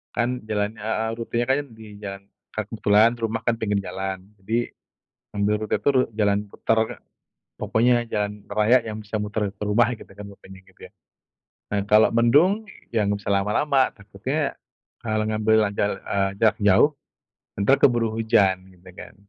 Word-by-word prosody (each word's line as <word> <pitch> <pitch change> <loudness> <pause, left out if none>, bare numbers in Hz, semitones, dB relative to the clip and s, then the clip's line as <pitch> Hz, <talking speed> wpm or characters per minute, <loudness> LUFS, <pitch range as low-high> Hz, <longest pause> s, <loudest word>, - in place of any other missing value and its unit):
Kan 125 +1 -1
jalannya 105 0 -2
heeh, 110 +1 -1
rutenya 120 +1 -2
kan 135 - +4
di 110 -1 -13 0.2
jalan, 100 -1 -7 0.3
ka 110 - -2
kebetulan 105 +1 +3
rumah 115 0 -2
kan 120 - +3
pinggir 105 -2 0
jalan 95 0 -4 0.2
jadi, 115 +5 -2 0.6
ngambil 100 +1 +1
rute - - +1
itu 105 +7 0
ru 130 - +5
jalan 100 -2 +2
putar, 115 - -1
Kak. - - -10 0.6
Pokoknya 120 +2 +2
jalan 105 -1 -1 0.2
raya 110 +4 +4
yang 110 - -5
bisa 105 +1 -4
muter 105 -1 -2
ke 100 - -44
rumah 115 +3 +3
gitu - - -14
kan, 105 - -8
pokoknya 95 -1 -14
gitu 95 - -25
ya. - - -40 0.8
Nah, 100 -1 +1
kalau 105 +1 +5
mendung, 145 - +3 0.3
ya 110 -3 +1
nggak 100 0 0
bisa - - -1
lama-lama. 130 +8 +2
Takutnya, 110 +9 -3 0.5
kalo 110 -1 0
ngambil 110 0 +1
terlanjur, 100 0 -1 0.2
eee, 95 -1 +1
jarak 110 0 +3
jauh, 105 +8 +5 0.7
entar 135 +8 +4
keburu 120 -3 +4
hujan, 105 -4 +3 0.2
gitu 90 0 -16
kan. - - -11
110 Hz, 165 wpm, -23 LUFS, 100-115 Hz, 0.8 s, ru